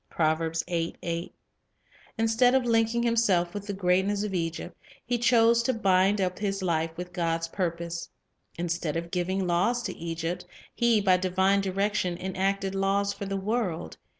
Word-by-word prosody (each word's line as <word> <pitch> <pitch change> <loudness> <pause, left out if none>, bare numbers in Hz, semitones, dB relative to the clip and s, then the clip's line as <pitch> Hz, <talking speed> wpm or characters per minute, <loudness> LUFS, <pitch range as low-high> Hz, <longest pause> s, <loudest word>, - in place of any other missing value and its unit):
1 160 0 +1 1.6
Instead 225 +3 +3
of 260 -2 +2
linking 230 0 +2
himself 205 -7 +2
with 205 0 -6
the - - -2
greatness 190 +2 +1
of 210 -2 -3
Egypt, 165 -2 -3 0.3
he 240 0 0
chose 235 -1 +4
to 250 +1 0
bind 195 -1 +3
up 185 -1 -1
his 195 -2 -2
life 165 -2 +1
with 180 0 -6
God's 165 -2 -1
pur 180 0 0
pose. 170 0 -6 0.5
Instead 170 -2 -2
of 170 0 -5
giving 185 +1 -1
laws 190 +8 +1
to - - -4
Egypt, 170 +2 -4 0.3
he 235 -3 +3
by 185 -2 +4
divine 190 +2 +2
direction 195 -2 -1
enacted 190 +1 -1
laws 200 +1 +1
for 200 - -6
the 195 0 -2
world. 195 -4 -2
190 Hz, 150 wpm, -27 LUFS, 175-210 Hz, 1.6 s, chose